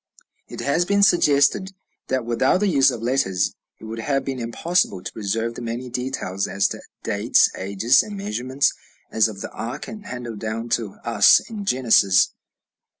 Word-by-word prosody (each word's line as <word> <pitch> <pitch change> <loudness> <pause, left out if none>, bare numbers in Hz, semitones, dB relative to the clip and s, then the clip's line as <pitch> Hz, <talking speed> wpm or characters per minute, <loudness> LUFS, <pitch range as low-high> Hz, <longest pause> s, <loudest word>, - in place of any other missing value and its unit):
It - - -8
has 140 +5 +1
been 200 +2 +2
suggested 175 +1 +3 0.3
that 130 -2 -1
without 120 +7 +2
the 210 - +2
use 140 -8 +4
of 120 -3 -5
letters 115 -8 0 0.3
it - - -17
would 110 +1 -6
have 135 +4 -1
been 135 -2 -4
impossible 120 - -1
to - - -6
preserve 115 +2 -2
the - - -8
many 120 +2 -5
details 120 -7 -3
as 100 0 +1
to - - -7 0.2
dates, - - +3
ages, 100 +6 +2
and 205 -1 -7
measurements, 140 - -1 0.4
as 110 0 +3
of 105 -3 -8
the - - -6
ark, 115 +2 -6
handed 125 - -7
down 115 +2 -4
to 115 -3 -2
us - - +6
in 210 -3 -7
Genesis. 115 - +3
125 Hz, 165 wpm, -22 LUFS, 110-140 Hz, 0.4 s, us